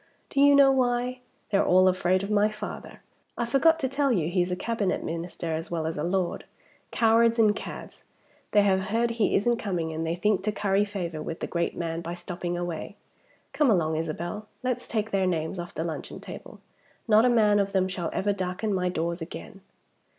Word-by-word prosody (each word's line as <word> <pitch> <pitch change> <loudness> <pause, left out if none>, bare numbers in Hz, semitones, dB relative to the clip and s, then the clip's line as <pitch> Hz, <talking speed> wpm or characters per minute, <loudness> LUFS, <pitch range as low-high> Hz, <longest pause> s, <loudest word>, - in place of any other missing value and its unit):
Do 275 - +2
you 285 0 +7
know 275 -1 +7
why? 250 -1 0 0.3
They're 200 - +3
all 185 +1 +5
afraid 185 0 +2
of 200 - -4
my 210 0 +3
father 215 0 -8 0.3
I 235 - 0
forgot 275 +7 +4
to 265 - +1
tell 275 +1 +1
you 170 -8 +1
he's 180 0 0
a - - 0
Cabinet 205 -1 -1
Minister 165 0 -4
as 160 +1 -4
well 165 -2 -2
as 160 0 -2
a 150 - -3
Lord. 180 0 -1 0.5
Cowards 230 +1 +3
and 215 -2 +4
cads. - - -8 0.5
They 205 -1 +4
have 190 -1 +2
heard 230 +4 0
he 230 -2 +1
isn't 235 +4 +2
coming 175 -7 -2
and 160 +1 -3
they 165 +1 -1
think 205 +2 +1
to 215 - +1
curry 205 0 +1
favor 175 -6 -4
with 165 +2 -5
the - - -2
great 170 -1 -2
man 165 -1 -3
by 170 +1 -5
stopping 175 -1 -4
away. 175 +2 -5 0.6
Come 295 -4 +3
along, 160 -6 +2
Isabel! 170 +6 -4 0.2
Let's 250 -1 -2
take 220 -1 -2
their 190 -1 +1
names 165 +1 -2
off 175 0 -7
the 160 - -2
luncheon 165 -2 -5
table. - - -10 0.5
Not 220 0 +6
a 250 - +4
man 210 -3 +4
of 200 0 0
them 190 -1 +2
shall 180 -3 -3
ever 205 +1 0
darken 190 +2 -2
my 180 -1 0
doors 170 0 -2
again!" 190 +3 -8
195 Hz, 200 wpm, -27 LUFS, 175-225 Hz, 0.6 s, you